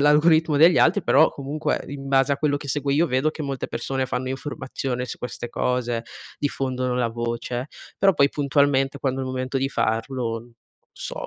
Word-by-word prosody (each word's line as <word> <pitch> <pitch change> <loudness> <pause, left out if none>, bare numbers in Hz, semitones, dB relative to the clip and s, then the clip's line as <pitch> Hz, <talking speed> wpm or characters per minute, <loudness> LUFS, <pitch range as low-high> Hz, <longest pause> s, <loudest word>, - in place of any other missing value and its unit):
l'algoritmo 155 +1 +4
degli 165 +2 +7
altri, 195 +4 +4
però 160 - +5
comunque 145 +3 -2
in 140 -1 -7
base 135 0 +3
a - - +1
quello 145 -1 +1
che 145 - -9
seguo 145 0 -1
io 160 +5 +3
vedo 130 +2 +1
che 155 - -7
molte 140 -2 -3
persone 135 -1 -2
fanno 130 0 -3
informazione 130 -2 -4
su - - -6
queste 120 0 -5
cose, 120 -1 -1 0.4
diffondono 130 -3 -1
la 125 -1 +1
voce; 120 +2 -3 0.3
però 195 0 +5
poi 140 -2 +4
puntualmente 140 -1 +1
quando 135 -1 -1
è - - -2
il 130 - -4
momento 130 +1 -3
di 135 +1 0
farlo 115 0 -1
n 120 +1 -17 0.4
so, - - -6
135 Hz, 185 wpm, -24 LUFS, 125-145 Hz, 0.4 s, degli